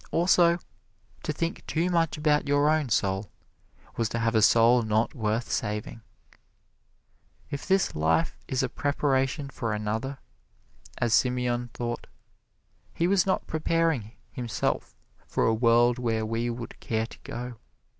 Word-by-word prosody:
Also, 170 0 +4 0.6
to - - -2
think 165 +3 -3
too 170 +3 0
much 165 -3 +1
about 150 -1 +2
your 145 +1 +3
own 155 -4 +1
soul 100 -1 0 0.7
was 115 -2 0
to 115 - -3
have 115 0 +1
a 110 - +4
soul 115 +3 +5
not 110 0 0
worth 110 0 -2
saving. 105 +1 -3 1.5
If 140 - -5
this 190 -2 +2
life 80 - +1
is 130 0 0
a - - +1
preparation 140 +1 0
for 115 -4 -3
another, 110 +6 -3 0.8
as 120 -2 +1
Simeon 125 -1 +1
thought, 120 -1 -4 0.9
he 170 - +1
was 195 -1 +3
not 190 - +1
preparing 160 -8 0 0.2
himself 120 -3 -2 0.3
for - - 0
a 115 - +3
world 120 +2 +4
where 115 -2 0
we 115 +2 -1
would 120 0 -6
care 110 -1 -1
to - - -13
go. 120 0 -6
120 Hz, 140 wpm, -27 LUFS, 115-150 Hz, 1.5 s, soul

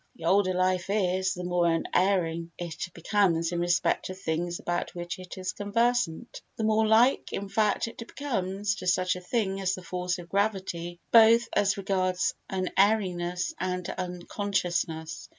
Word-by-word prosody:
The 165 - -9
older 185 +1 +3
life 185 0 +1
is, 190 -2 +1
the 180 - -6
more 175 -1 +1
unerring 170 0 +1
it 170 0 -5
becomes 170 -2 +1
in 175 - -1
respect 175 +1 +1
of 185 - -6
things 170 +1 -2
about 175 +1 -3
which 175 +1 -5
it 185 +1 -9
is 185 0 -3
conversant—the 230 0 -1
more 220 0 +3
like, 230 +4 +4
in 200 - -3
fact, 210 +2 +1
it 230 - -10
becomes 205 -6 -2
to 185 - -6
such 185 0 +2
a 180 - -7
thing 195 0 -1
as 190 0 0
the 185 - -10
force 180 0 -2
of 175 -1 -9
gravity, 190 -3 -2
both 230 +1 +7
as 200 -1 +2
regards 185 -2 0 0.2
unerringness 185 -2 +1
and 180 -1 -2
unconsciousness. 175 -3 -3
185 Hz, 150 wpm, -28 LUFS, 175-205 Hz, 0.2 s, both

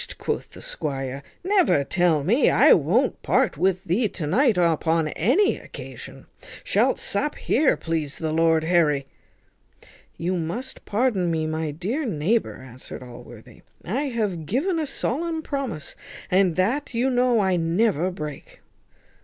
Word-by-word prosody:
quoth - - -3
the - - -10
squire, 135 -2 -4 0.2
"never 370 - +3
tell 170 -2 +1
me. 230 - +3
I - - +6
won't - - +1
part - - +1
with 185 -1 +1
thee 205 +5 +1
to 165 - -5
night 240 - +3
upon 165 -2 +2
any 270 - +2
occasion. - - -10 0.4
Shalt - - +2
sup 295 - -1
here, 290 +2 +2
please 155 -4 -3
the 160 -1 -2
lord 160 0 +3
Harry." 160 -5 +2 1.1
"You 180 +2 -1
must 215 +11 -5
pardon 205 -5 +1
me, 160 -1 0
my 155 0 -2
dear 190 - -3
neighbour!" 205 - -1
answered 130 0 -10
Allworthy; 125 -1 -13 0.2
"I 255 +11 -1
have 210 - -2
given 325 - 0
a 310 - -2
solemn 320 +5 -2
promise, 265 - -4 0.4
and 185 -2 +3
that 235 +8 -1
you 255 +3 +1
know 245 -2 +3
I 190 -2 +2
never 175 +1 +1
break." 150 -5 -8
180 Hz, 140 wpm, -24 LUFS, 160-245 Hz, 1.1 s, I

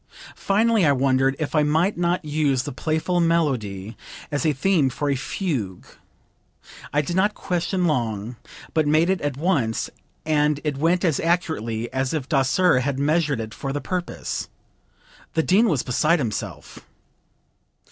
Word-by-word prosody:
Finally 220 +1 +2
I 145 -3 +5
wondered 135 0 +2
if 155 - -3
I 155 - +4
might 160 +7 +2
not 175 0 0
use 145 -4 +1
the - - -5
playful 160 +6 -1
melody 125 - 0 0.4
as 145 +3 0
a - - +4
theme 150 0 +2
for 145 +3 -2
a - - +1
fugue. 130 - -3 1.1
I 150 +1 +1
did 175 +4 -3
not 205 +3 +2
question 180 +1 -1
long, 120 -6 -1 0.4
but 155 -2 +2
made 160 +4 +3
it 190 - -1
at 145 -2 -2
once, 140 - 0 0.3
and 150 -1 +2
it 150 -3 -2
went 175 +4 +2
as 160 -5 +1
accurately 120 -10 -1
as 130 +3 -1
if 140 -4 -3
Daser 140 +2 +3
had 135 +1 -1
measured 145 -1 +1
it 110 -1 -5
for 135 - -4
the 145 - -2
purpose. 180 +3 -4 0.9
The 160 - +2
dean 210 +8 +4
was 145 -8 +1
beside 150 +7 +2
himself." 115 -9 -5
150 Hz, 155 wpm, -23 LUFS, 130-170 Hz, 1.1 s, I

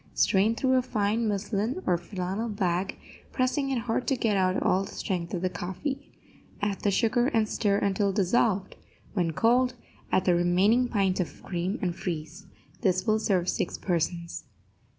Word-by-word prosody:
Strain 205 +4 +3
through 260 +1 +2
a - - +4
fine 220 -1 0
muslin 210 - -1
or 180 - +3
flannel 185 +5 -3
bag, 190 -2 -1 0.3
pressing 270 +2 0
it 265 - 0
hard 235 +1 -2
to 270 - +2
get 225 -4 +1
out 185 -1 +2
all 190 +1 +2
the - - -8
strength 175 -3 -3
of 180 -1 -3
the 185 - +2
coffee. 265 - -5 0.5
Add 205 -1 -1
the 205 - +2
sugar 240 +4 +2
and 225 -5 +2
stir 205 -2 +1
until 200 0 +1
dissolved; 195 0 +1 0.4
when 175 -5 +1
cold, 245 +6 +3 0.4
add 185 - +2
the 180 - +4
remaining 185 +8 +3
pint 195 -5 +1
of 165 -6 -4
cream 180 +3 -2
and 175 -2 0
freeze. 160 -1 -5 0.3
This 185 -4 +1
will 215 -1 +3
serve 185 -5 +1
six 175 - -1
persons. 170 -1 -2
200 Hz, 170 wpm, -27 LUFS, 180-230 Hz, 0.5 s, a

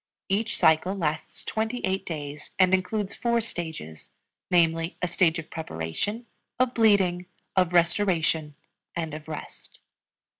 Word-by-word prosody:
Each 210 +3 0
cycle 160 +5 +4
lasts 155 -4 -3
twenty 220 +3 -1
eight 190 0 -1
days, 145 -3 -6
and 185 -1 +5
includes 195 +2 0
four 235 -1 +1
stages, 160 - -6 0.4
namely, 165 -1 +2
a 180 - 0
stage 175 -1 +3
of 160 - -7
preparation, 160 - -3 0.3
of 255 0 +2
bleeding, 190 -6 +3 0.3
of 180 -2 +3
restoration, 170 -4 +2 0.4
and 160 -2 -3
of 155 0 -7
rest. 155 -1 -8
175 Hz, 125 wpm, -27 LUFS, 160-200 Hz, 0.4 s, and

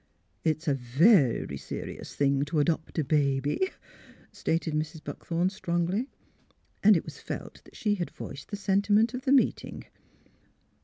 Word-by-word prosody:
'' - - -43
It's 155 +2 -7
a 145 - +4
ver 135 - +4
ry 70 - -5
se - - -6
rious - - -8
thing 140 -1 +2
to 155 +2 -3
adopt 160 +2 0
a 160 - +2
ba 140 -2 +2
by," 150 - -1 0.6
stated 165 -1 -1
Mrs. 155 +1 -3
Buckthorn, 175 +2 -2
strongly. 185 +5 -1 0.7
And 205 -2 +7
it - - -4
was - - -9
felt - - -7
that - - -18
she 210 -2 0
had 180 -4 -2
voiced 140 - -9
the 205 - -4
sentiment 205 +3 +2
of 255 +2 -5
the 265 - +2
meeting. 275 -2 +2
165 Hz, 165 wpm, -28 LUFS, 145-205 Hz, 0.7 s, And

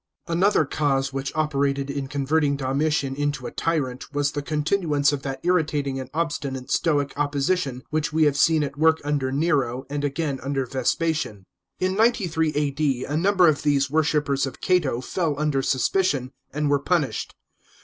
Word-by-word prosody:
§ - - -19
19. 170 +1 0
Another 195 -5 +4
cause 135 -2 0
which 135 0 -3
operated 140 -3 0
in 140 -1 -3
converting 145 +1 +1
Domitian 140 +1 0
into 145 +1 -2
a - - -4
tyrant 140 -7 -2
was 145 -1 0
the 145 - -3
continuance 150 -1 +1
of 145 -2 -3
that 135 -1 -4
irritating 150 -6 0
and 130 - -7
obstinate 145 -5 -3
Stoic 145 -4 +1
opposition 145 -2 0
which 150 -1 0
we 160 +1 +2
have 145 -2 +3
seen 160 +1 +3
at 145 0 -5
work 160 0 +4
under 145 -3 -1
Nero, 135 -4 0
and 145 0 -2
again 145 -1 -2
under 135 0 -1
Vespasian. 130 - -1 0.3
In 185 0 +1
93 190 -8 +2
A.D., 140 -3 0
a 145 - -3
number 185 +2 +4
of 155 -2 +2
these 140 -2 +1
worshippers 150 -3 +1
of 130 - -9
Cato 155 -10 +1
fell 155 0 -2
under 150 -3 +1
suspicion, 135 -1 +1 0.2
and 150 +1 -1
were 145 0 +3
punished. 155 -1 -1
145 Hz, 170 wpm, -24 LUFS, 135-160 Hz, 0.3 s, Another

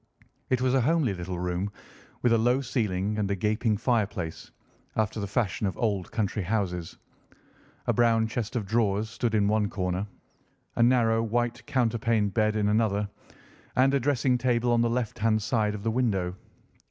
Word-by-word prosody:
It 130 -1 +1
was 130 0 +2
a 135 - +4
homely 150 -4 +2
little 90 0 -5
room, 90 +3 -2 0.5
with 120 -2 +4
a - - +5
low 120 +3 +3
ceiling 105 -5 -1
and 100 -2 0
a 100 - +1
gaping 105 +2 0
fireplace, 105 -8 -1 0.5
after 110 0 0
the 100 - -3
fashion 105 -1 -1
of 95 - -4
old 100 -6 -1
country 105 -1 -1
houses. 90 -3 -2 0.9
A - - +2
brown 115 -2 +3
chest 115 0 -4
of 115 -4 -1
drawers 110 0 0
stood 120 -2 -1
in 100 -2 +3
one 105 -1 +1
corner, 90 +1 -2 0.7
a - - 0
narrow 115 -2 +4
white 120 +2 -1
counterpaned 115 -4 +1
bed 110 -1 +2
in 105 -1 +1
another, 105 -1 +1 0.7
and 135 +2 +4
a 140 - +3
dressing 130 -1 +1
table 120 -1 +1
on 120 0 +3
the 120 - +2
left 120 -1 -2
hand 110 0 +2
side 110 -2 0
of 100 - -7
the 115 - 0
window. 100 -7 0
110 Hz, 175 wpm, -27 LUFS, 100-120 Hz, 0.9 s, a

